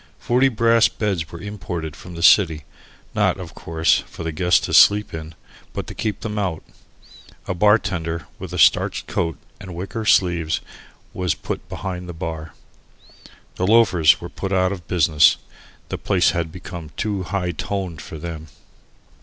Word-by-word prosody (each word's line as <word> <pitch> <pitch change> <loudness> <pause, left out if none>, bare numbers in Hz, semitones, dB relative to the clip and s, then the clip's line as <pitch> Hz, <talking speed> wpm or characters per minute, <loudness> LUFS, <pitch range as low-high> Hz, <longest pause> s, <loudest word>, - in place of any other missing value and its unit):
Forty 125 +3 +2
brass 115 -1 +4
beds 95 -7 -3
were 85 - -8
imported 85 -5 -5
from 90 +2 -11
the 85 - -5
city, 80 -6 +5 0.5
not, - - +1
of - - -8
course, 80 0 +1
for - - -9
the 80 - -2
guests 90 +3 +3
to - - -4
sleep 105 0 +6
in, 80 0 -7 0.4
but - - -4
to - - -8
keep 105 -2 -3
them 105 -1 -3
out. 90 -6 -2 0.8
A - - -1
bar 105 +4 +5
tender 85 -6 -4
with - - -7
a - - -4
starched - - +3
coat 85 -2 -2 0.2
and 95 -3 -9
wicker 95 +5 -5
sleeves 85 -5 +2 0.5
was 90 -3 -1
put - - -6
behind 90 -2 -5
the - - -5
bar. 80 -1 -6 1.0
The 95 - 0
loafers 95 -8 +5
were 85 - -7
put 95 +2 -5
out 95 -1 +2
of 90 -4 -7
business. 80 -4 +4 0.5
The - - -4
place 90 -3 +2
had 85 -3 -2
become 85 -2 -8
too 105 -3 -1
"high 90 -1 -2
toned" 90 -1 -4
for 80 - -8
them. 80 0 -7
90 Hz, 165 wpm, -21 LUFS, 80-100 Hz, 1.0 s, sleep